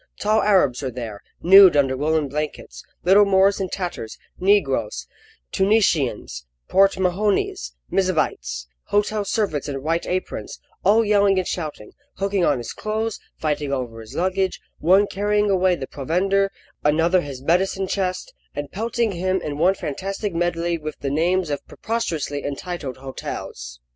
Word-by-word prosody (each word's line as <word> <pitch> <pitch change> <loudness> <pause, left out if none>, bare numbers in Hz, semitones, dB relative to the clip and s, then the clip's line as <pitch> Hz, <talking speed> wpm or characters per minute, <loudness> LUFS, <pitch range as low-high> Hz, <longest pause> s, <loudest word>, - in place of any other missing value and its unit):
Tall 215 +1 +2
Arabs 185 -12 +3
were 135 - -2
there, 115 -5 -7 0.2
nude 190 -2 +8
under 135 -2 +3
woollen 155 +2 +1
blankets, 145 - -5 0.2
little 195 +4 +6
Moors 195 0 +3
in 190 -1 -2
tatters, 175 - -5 0.2
Negroes, 135 - +1 0.5
Tunisians, 150 - +1 0.2
Port 195 0 +4
Mahonese, 185 - 0 0.2
M'zabites, 145 - 0 0.2
hotel 205 +1 0
servants 195 -8 -1
in 135 -1 -4
white 165 +2 -1
aprons, 185 +1 -4 0.2
all 220 +4 +4
yelling 200 -2 +3
and 185 - 0
shouting, 155 -11 -5 0.2
hooking 195 -1 0
on 150 -5 +3
his 120 -1 -6
clothes, 220 +1 -3 0.2
fighting 150 -2 -2
over 120 -4 -3
his 110 - -12
luggage, 190 +1 0 0.2
one 190 +5 +5
carrying 205 +1 0
away 185 -1 +3
the 135 - -5
provender, 195 +9 0 0.3
another 165 +5 +3
his 135 -4 -8
medicine 190 +4 +1
chest, 185 -1 -2 0.2
and 145 -1 -5
pelting 230 +2 -1
him 185 +1 0
in 150 -4 -5
one 185 +4 +4
fantastic 195 +5 -4
medley 170 0 -1
with 155 -1 -6
the 140 - -2
names 170 +2 +1
of 145 - -3
preposterously 165 -11 -3
entitled 145 -2 -5
hotels. 60 - -7
175 Hz, 145 wpm, -22 LUFS, 145-195 Hz, 0.5 s, nude